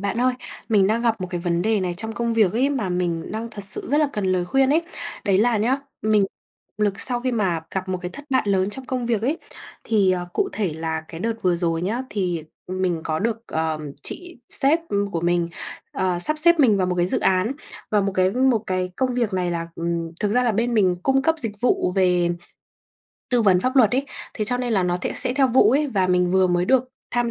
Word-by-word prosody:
bạn 200 +4 -2
ơi, 255 0 +2 0.3
mình 205 -4 +4
đang 225 +3 +1
gặp 225 -4 +1
một 185 - -2
cái 175 -2 -3
vấn 170 -1 0
đề 220 0 +1
này 180 -2 -2
trong 220 +5 -4
công 235 +2 -1
việc 210 -5 +3
ấy, 250 +5 +2
mà 245 -9 -1
mình 175 -2 -2
đang 225 +2 -4
thật 205 - -5
sự 195 - -4
rất 290 - +3
là 300 - +2
cần 210 -5 -2
lời 180 -1 +1
khuyên 270 +7 +2
ấy. 320 +3 +3 0.4
Đấy 195 -3 +3
là 235 +1 +3
nhá, 240 +6 +2 0.3
mình 215 -2 +3 0.5
lực 205 -2 0
sau 245 -1 0
khi 255 0 -1
mà 190 -8 0
gặp 190 -1 -3
một 185 -1 -1
cái 180 - -4
thất 285 +6 -10
bại 260 - +3
lớn 195 -1 +1
trong 260 +5 -4
công 250 -1 -3
việc 230 -3 0
ấy. 285 +8 0 0.5
Thì, 205 -4 +3
ờ, 180 -1 -1
cụ 395 - 0
thể 195 -7 -1
là 160 0 -3
cái 165 - -8
đợt 230 +4 0
vừa 180 -2 +2
rồi 165 -1 -1
nhá, 220 +8 -1
thì, 175 -6 -2 0.2
ừm, 185 +1 -4
mình 175 -3 0
có 155 -1 -1
được, 225 +3 -1
ờ, 160 -1 -1 0.2
chị 355 -4 -4
sếp, 295 +5 +3
ừm, 200 0 -1
của 170 - -2
mình, 175 0 +1 0.4
ờ, 185 -2 0
sắp 305 +13 +2
xếp 340 +1 +5
mình 230 -7 +5
vào 185 -2 +1
một 180 - -1
cái 175 0 +2
dự - - -1
án. 190 +6 +2 0.4
Và 210 - +3
một 195 0 -1
cái 185 0 +3
một 250 -1 +2
cái 185 -1 -1
công 255 -1 0
việc 235 -4 0
này 180 -2 0
là 170 -1 -3
ừm, 170 0 -3
thực 210 - +1
ra 250 +4 +3
là 240 -2 +2
bên 235 +3 0
mình 185 -5 +3
cung 270 0 +2
cấp 320 +4 +3
dịch 210 -7 -4
vụ 240 -6 +1
về 180 -2 +3 1.0
tư 245 -2 +3
vấn 190 -4 +4
pháp 255 +6 -1
luật 230 -6 +6
ấy. 275 +2 0 0.3
Thế 215 - -1
cho 245 +4 +2
nên 250 -1 -2
là 195 -4 +2
nó 175 0 0
thẽ - - -2
sẽ 250 - +2
theo 270 -1 +4
vụ 250 +2 +5
ấy 290 +4 +2
và 195 -7 +1
mình 180 -1 +2
vừa 190 0 +4
mới 175 0 +1
được 260 +5 +3 0.3
tham 240 -1 0
205 Hz, 250 wpm, -22 LUFS, 180-245 Hz, 1.0 s, luật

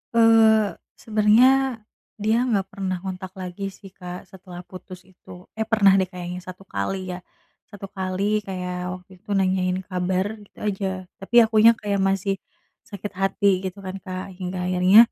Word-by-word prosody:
Eee, 220 -2 +5 0.2
sebenernya, 230 +3 +3 0.3
dia 220 +4 +1
nggak 200 -5 +1
pernah 190 -2 -3
ngontak 190 0 -6
lagi 185 +2 -5
sih 195 0 -14
Kak 180 -1 -8
setelah 180 -1 -11
putus 185 0 -11
itu. 180 -1 -14
Eh, 220 0 -3
pernah 205 -4 +5
deh 190 - +1
kayaknya 180 -1 -6
1 185 +1 -10
kali 185 - -3
ya, 180 - -6 0.5
1 205 -2 -9
kali 195 +2 -1
kayak 180 -1 -4
waktu 180 0 -16
itu - - -23
nanyain 185 -1 +1
kabar 185 0 -1 0.2
gitu 205 - -20
aja, 200 -2 -1 0.3
tapi 195 +5 -5
akunya 220 +1 +5
kayak 200 -1 -1
masih 195 0 0 0.5
sakit 200 0 -7
hati 195 0 +2
gitu 195 +2 -9
kan 190 +1 -6
Kak, 185 +1 -6
hingga 180 0 -3
akhirnya, 185 +6 +6
190 Hz, 155 wpm, -23 LUFS, 185-210 Hz, 0.5 s, akhirnya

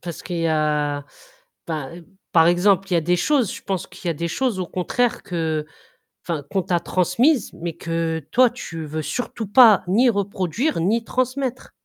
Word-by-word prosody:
parce 170 -2 -7
qu'il 175 -2 -4
y 165 - 0
a, 150 -2 0 0.6
ben, 160 +1 -5 0.3
par 165 -1 +6
exemple, 190 +2 +3
il - - +1
y - - +5
a - - +3
des 175 +3 +1
choses 250 - +1
je - - -10
pense 190 -3 -3
qu'il 180 - -8
y - - +2
a 165 - -1
des 170 +3 -3
choses 245 +2 -1
au 180 - -2
contraire 230 +8 -1
que, 160 -4 -2 0.6
enfin, 160 -4 -2
qu'on 195 - +1
t'a 175 -1 0
transmises, 185 - +1
mais 170 0 -5
que 165 0 -2
toi, 255 0 +5
tu 165 -10 -7
veux 155 +1 -4
surtout 230 - -4
pas 220 -1 +7
ni 230 +8 +4
reproduire 200 - -1
ni 220 +7 +1
transmettre. 255 +1 -2
180 Hz, 185 wpm, -22 LUFS, 165-230 Hz, 0.6 s, pas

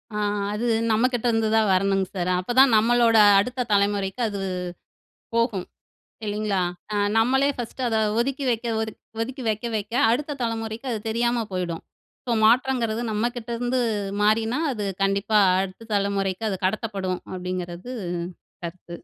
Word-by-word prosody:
ஆ. - - -1 0.4
அது 215 +3 -2 0.3
நம்மக்கிட்ட 245 +2 +1
இருந்துதான் 220 -1 +2
வரணுங்க 195 0 +2
சார். 175 0 -1
அப்பதான் 245 +5 +4
நம்மளோட 230 0 +4 0.2
அடுத்த 250 +4 -1
தலைமுறைக்கு 200 +2 +1
அது 200 -1 -4 0.9
போகும். 230 -6 +1 0.6
இல்லைங்களா? 210 -2 -1 0.3
அ - - 0 0.2
நம்மளே 265 +5 +3
ஃபர்ஸ்ட்டு 245 +2 -4
அத 225 - 0 0.2
ஒதுக்கி 275 +3 -1
வைக்க, 235 0 -1
ஒதுக் 220 0 -4 0.2
ஒதுக்கி, 255 +3 -4
வைக்க 215 +2 -1
வைக்க 210 +2 -5 0.2
அடுத்த 285 +4 -1
தலைமுறைக்கு 225 +2 -3
அது 225 - -1
தெரியாம 235 +1 +1
போயிடும். 175 -3 -3 0.4
ஸோ, 245 - -2
மாற்றங்கிறது 235 -1 +2
நம்மக்கிட்ட 240 +2 -2
இருந்து 245 +1 0 0.4
மாறினா, 220 +4 +2
அது 215 -4 -4 0.2
கண்டிப்பா 200 +2 +2 0.2
அடுத்த 195 +4 -8
தலைமுறைக்கு 200 0 0
அது 190 - -3
கடத்தப்படும். 195 -3 -2
அப்பிடிங்கிறது 180 +4 -5 0.7
கருத்து. 170 0 -7
220 Hz, 130 wpm, -24 LUFS, 195-240 Hz, 0.9 s, அப்பதான்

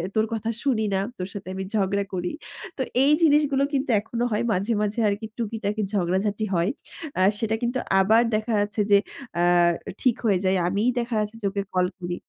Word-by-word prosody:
তোর 220 0 +3
কথা 225 0 -2
শুনি 240 -6 +1
না, - - +2 0.2
তোর 180 0 -4
সাথে 200 -2 -8
আমি 190 - -3
ঝগড়া 200 -1 +1
করি। 180 -1 -2 0.5
তো - - -2 0.2
এই 290 - +5
জিনিসগুলো 290 -3 +4
কিন্তু 270 -1 0
এখনো 235 +3 -3
হয় 210 +3 0
মাঝে, 200 +5 0
মাঝে 210 +2 -1
আরকি 205 +2 -2
টুকিটাকি 220 -2 -2
ঝগড়াঝাটি 200 +3 0
হয়। 170 +4 +2 0.5
আ - - +3 0.2
সেটা 220 -1 0
কিন্তু 240 +2 0 0.2
আবার 220 +4 +5
দেখা 215 +2 -1
যাচ্ছে 210 +1 -1
যে, 200 - +8 0.4
অ্যা 175 - +1 0.6
ঠিক 250 -3 +3
হয়ে 195 -4 +3
যায়। 190 0 +3
আমিই 205 +6 +1
দেখা 235 -1 -2
যাচ্ছে 210 +1 -3
যে - - -4
ওকে 200 0 -2
কল 180 0 +3
করি। 175 0 -3
210 Hz, 190 wpm, -24 LUFS, 195-230 Hz, 0.6 s, যে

